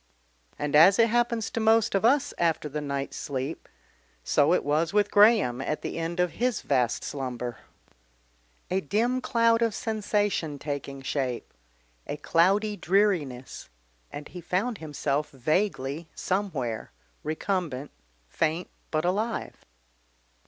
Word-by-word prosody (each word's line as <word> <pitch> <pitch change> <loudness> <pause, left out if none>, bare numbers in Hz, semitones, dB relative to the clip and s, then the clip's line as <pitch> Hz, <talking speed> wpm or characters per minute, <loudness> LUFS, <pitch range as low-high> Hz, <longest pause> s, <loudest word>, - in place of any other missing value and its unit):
And 145 0 -1
as 175 +6 +8
it 230 -1 +5
happens 235 -1 +1
to - - -2
most 220 0 +3
of 195 - +1
us 280 +4 +3
after 165 -3 +1
the 150 +1 -4
night's 140 -1 -3
sleep, 140 +2 -4 0.5
so 145 +2 +3
it 180 - +3
was 155 +4 +1
with 205 -1 +2
Graham 205 - +5
at 150 +3 -3
the - - -4
end 165 +2 -3
of 180 -1 +2
his 245 0 -1
vast 125 -4 +1
slumber. 125 -3 -4 1.1
A 190 +1 +1
dim 235 - 0
cloud 230 -1 +3
of 230 -3 +1
sensation 205 -8 -1
taking 140 -1 -5
shape, 130 -3 -3 0.5
a - - -3
cloudy 195 +7 +2
dreariness, 175 - 0 0.4
and 145 0 -7
he 180 - -9
found 195 +7 -1
himself 150 -1 -2
vaguely 155 - -1
somewhere, 155 - -2 0.3
recumbent, 155 -4 -2 0.4
faint, 160 - -1 0.2
but 155 +1 0
alive. 215 +6 -1
170 Hz, 130 wpm, -27 LUFS, 145-210 Hz, 1.1 s, as